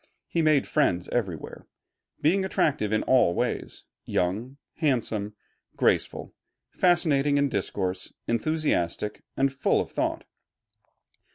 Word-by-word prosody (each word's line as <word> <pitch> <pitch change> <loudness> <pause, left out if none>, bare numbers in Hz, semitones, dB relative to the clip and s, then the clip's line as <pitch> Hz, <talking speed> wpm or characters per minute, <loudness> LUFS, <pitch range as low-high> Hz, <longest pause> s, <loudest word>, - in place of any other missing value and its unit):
He 170 - 0
made 155 -3 +3
friends 90 - +1
everywhere, 95 -10 -3 0.6
being 185 +6 +3
attractive 150 - 0
in 110 - +1
all 125 -10 +4
ways, - - -3 0.2
young, 110 +10 -2 0.2
handsome, 110 -8 0 0.4
graceful, - - 0 0.4
fascinating 150 -6 +3
in 140 0 +2
discourse, 95 -3 -2 0.2
enthusiastic, 115 - 0 0.2
and 135 0 +2
full 135 - +2
of - - -3
thought. - - -1
130 Hz, 105 wpm, -26 LUFS, 100-150 Hz, 0.6 s, all